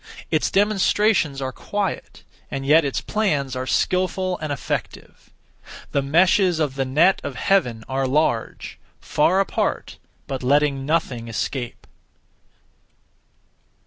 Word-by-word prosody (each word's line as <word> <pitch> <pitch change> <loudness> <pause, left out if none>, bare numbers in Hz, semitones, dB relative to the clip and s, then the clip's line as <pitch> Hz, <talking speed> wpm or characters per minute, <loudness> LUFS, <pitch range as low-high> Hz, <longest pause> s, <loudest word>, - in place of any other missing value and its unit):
Its - - +1
demonstrations 200 -7 +2
are 130 - -3
quiet, 200 +7 -4 0.3
and 135 -1 -4
yet 155 +4 +5
its 140 -2 -2
plans 145 - -1
are 130 0 -4
skilful 185 +4 0
and 155 -1 -4
effective. 140 - -5 0.6
The 140 - +1
meshes 175 +5 +3
of 150 -4 0
the 135 0 -2
net 155 +9 +3
of - - -5
Heaven 125 - +1
are 135 0 -1
large; 130 -4 -1 0.2
far 180 +5 +2
apart, 195 - -2 0.3
but 135 -2 -5
letting 140 +1 +1
nothing 135 -7 -1
escape. 120 +2 -4
145 Hz, 115 wpm, -22 LUFS, 135-185 Hz, 0.6 s, yet